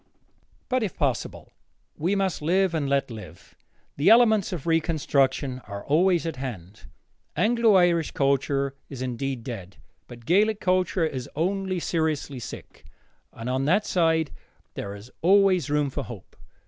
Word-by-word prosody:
But, 255 -1 0
if 210 -5 -3
possible, 135 -6 -2 0.4
we 180 +6 0
must 190 -5 -1
live 185 +3 +2
and 150 -4 -1
let 140 -2 0
live. 95 -7 -11 0.4
The 145 +7 +4
elements 220 -3 +5
of 170 -7 -5
reconstruction 140 -5 +1
are 100 -1 -7
always 170 +3 +3
at 165 -5 -4
hand. 110 -7 -7 0.5
Anglo 230 -1 +3
Irish 175 -3 +3
culture 140 0 0 0.2
is 130 -3 -6
indeed 130 0 -3
dead, 100 -7 -7 0.3
but 120 -2 -12
Gaelic 205 - +3
culture 185 -2 +1
is 130 -5 -4
only 185 +3 -1
seriously 155 -5 -1
sick, 120 - -10 0.5
and 115 - -8
on 130 +1 0
that 195 +8 +2
side 165 -3 +1 0.4
there 100 0 -6
is 105 +5 -13
always 185 -3 +4
room 145 -1 +1
for 145 - -3
hope. 120 -6 -11
155 Hz, 145 wpm, -25 LUFS, 130-185 Hz, 0.5 s, elements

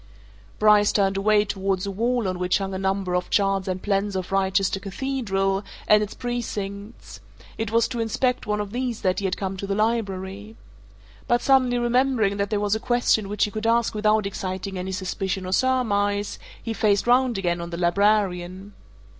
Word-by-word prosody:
Bryce 210 -1 +5
turned 195 -1 +1
away 210 +1 +3
towards 195 -1 -2
a 200 - -3
wall 235 +2 0
on 185 -1 -3
which 180 0 +2
hung 195 -1 -4
a 190 - -3
number 190 -1 -1
of 180 0 -1
charts 195 -2 +1
and 185 0 -3
plans 200 0 0
of 185 -1 -4
Wrychester 195 0 +1
Cathedral 195 -3 -1 0.2
and 210 0 +6
its 210 -1 -4
precincts 210 -3 -5 0.4
it 225 -1 -3
was 230 +1 +2
to 240 - -4
inspect 250 +3 0
one 210 0 0
of 205 -1 -4
these 245 -1 -3
that 185 -1 +1
he 200 - -3
had 185 - -1
come 195 -1 -3
to 200 - -5
the 195 - -1
Library. 210 -1 -2 0.7
But 240 0 +2
suddenly 255 -2 +3
remembering 240 -4 +1
that 200 0 -1
there 210 - 0
was 205 0 0
a 220 - 0
question 235 -4 +1
which 210 0 0
he 210 - -6
could 220 +1 -3
ask 230 0 +2
without 215 0 +2
exciting 190 0 -4
any 185 +1 -4
suspicion 190 0 -3
or 185 - -4
surmise, 205 -5 +1 0.2
he 225 - -3
faced 205 -1 +2
round 245 -1 +3
again 175 -3 -1
on 170 - -6
the 170 - -5
librarian. 190 +1 +1
200 Hz, 190 wpm, -24 LUFS, 195-225 Hz, 0.7 s, and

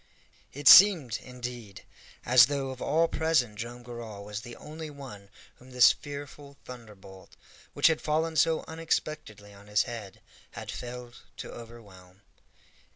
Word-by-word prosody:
It 145 +1 -4
seemed, 170 - +8
indeed, 120 -5 -9 0.4
as 125 0 +7
though 140 -2 -3
of 130 - -10
all 165 +2 +2
present 140 -11 0
Joam 120 +1 -7
Garral 115 -4 -9
was 105 +1 -6
the 120 -1 -10
only 155 +1 -9
one 130 -9 -11 0.3
whom 125 - -18
this 125 -1 +6
fearful 140 0 -10
thunderbolt, 105 -6 -13 0.4
which - - 0
had 160 -1 +4
fallen 160 +1 -1
so 160 0 +2
unexpectedly 155 -10 -4
on 100 +1 -17
his 105 0 +2
head, 110 -5 -9 0.3
had - - -7
failed 120 0 -9 0.2
to - - -8
overwhelm. 100 -5 -14
125 Hz, 140 wpm, -28 LUFS, 105-145 Hz, 0.4 s, seemed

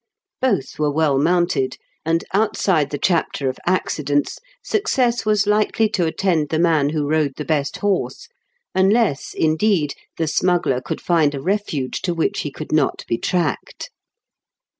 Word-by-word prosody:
Both 255 - 0
were 150 -1 +2
well 145 -2 +2
mounted, 170 -5 +1 0.3
and, 165 +1 0
outside 190 -7 +1
the 145 - -3
chapter 160 -5 0
of 130 - -6
accidents, 145 -5 0 0.2
success 255 - 0
was 210 -1 +3
likely 215 +1 +2
to 175 -5 0
attend 160 -3 0
the 160 - 0
man 160 -4 +3
who 150 -1 -1
rode 150 -2 +1
the 150 - -4
best 145 -1 -1
horse; 205 - -1 0.5
unless, 195 - +2
indeed, 160 -1 +1 0.2
the 165 - 0
smuggler 170 -6 +1
could - - -5
find 160 -4 +2
a - - -4
refuge 165 -6 -2
to 175 -3 -1
which 165 - 0
he - - -3
could - - -8
not - - +1
be 115 - -1
tracked. 175 -4 -2
165 Hz, 150 wpm, -20 LUFS, 145-195 Hz, 0.5 s, was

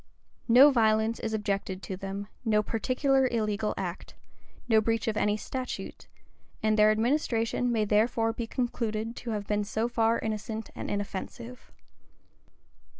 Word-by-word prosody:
No 255 +5 +8
violence 220 -2 +2
is 225 - -3
objected 200 -3 -2
to 190 - -4
them; 195 +1 -5 0.2
no 215 -3 +2
particular 265 +4 +1
illegal 215 -3 -1
act;[*] 180 -1 -5 0.5
no 220 -2 +5
breach 225 0 0
of 220 - 0
any 210 0 +1
statute; 255 +4 -6 0.6
and 215 0 +3
their 210 0 +6
administration 230 +1 +1
may 220 -2 +1
therefore 225 +2 +2
be 230 0 -4
concluded 230 -2 -2
to 240 - -6
have 210 -2 -2
been 210 0 0
so 220 +3 -1
far 230 -1 +2
innocent 220 0 -4
and - - -6
inoffensive. 205 +4 -6
220 Hz, 140 wpm, -28 LUFS, 210-235 Hz, 0.6 s, No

